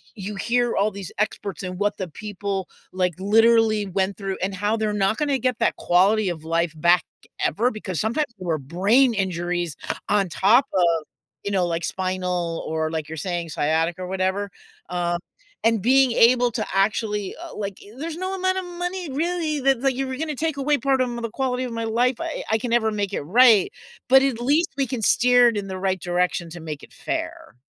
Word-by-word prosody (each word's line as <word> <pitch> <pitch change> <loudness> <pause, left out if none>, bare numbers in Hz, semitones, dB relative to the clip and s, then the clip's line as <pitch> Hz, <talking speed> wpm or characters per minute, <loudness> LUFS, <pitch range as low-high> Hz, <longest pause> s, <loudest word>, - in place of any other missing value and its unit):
you 205 0 -6
hear 240 +4 0
all 210 +2 +2
these 195 -3 -8
experts 200 -4 -2
and 180 0 -5
what 205 0 0
the 185 - -4
people, 200 0 -4 0.2
like, 180 -1 0
literally 220 +1 +4
went 190 +1 -1
through 195 -2 -4
and 195 +1 -1
how 205 +3 0
they're 215 -1 -1
not 200 +1 +1
gonna 285 -3 0
get 250 -2 -1
that - - +2
quality 195 +3 +3
of 165 -3 -5
life 165 0 0
back 175 +3 +4 0.4
ever 240 +5 +1
because 190 -6 -5
sometimes 235 +8 0
there 185 -2 -8
were 160 -2 +1
brain 200 - +3
injuries 175 -4 -2 0.3
on 205 -2 +2
top 220 - +4
of, 170 -4 +2 0.4
you 200 - -3
know, 190 -3 +2
like 170 -1 -2
spinal, 180 -3 -2
or 160 0 -1
like 160 -2 -4
you're 160 - -6
saying, 175 -1 -3
sciatica 160 +4 0
or 180 - -5
whatever, 190 +2 -1 0.4
um, 175 -1 -1 0.5
and 225 -2 +3
being 260 +3 +4
able 245 +1 +5
to - - -2
actually, 205 0 0
eh, 340 0 -8
like 200 -2 -4
i 205 - -14
there's 325 +1 -4
no 370 +2 -3
amount 375 0 0
of 375 - -2
money 355 -1 -4
really 320 0 -1
that 270 -2 +2
like, 270 0 +2
if 255 - -9
you 270 - -1
were 260 - -4
gonna 305 0 -3
take 320 +1 -1
away 290 +2 +2
part 270 -1 +1
of 250 - +1
m 240 - -5
the 230 - -3
quality 255 +1 -2
of 240 - -6
my 230 0 -3
life, 245 +3 +1
I 330 -1 -4
I 220 - +4
can 245 - -4
never 220 -2 +2
make 205 -2 -2
it - - -1
right, 225 - +5 0.4
but 265 +1 +7
at 260 -4 0
least 300 +7 +2
we 275 -2 +1
can 245 -1 -3
steer 245 +2 +5
it 220 - -3
in 200 - -3
the 190 -1 -5
right 190 -1 0
direction 175 -1 -1
to 175 - -8
make 155 -3 -6
it - - -14
fair. - - -5
205 Hz, 210 wpm, -23 LUFS, 180-250 Hz, 0.5 s, but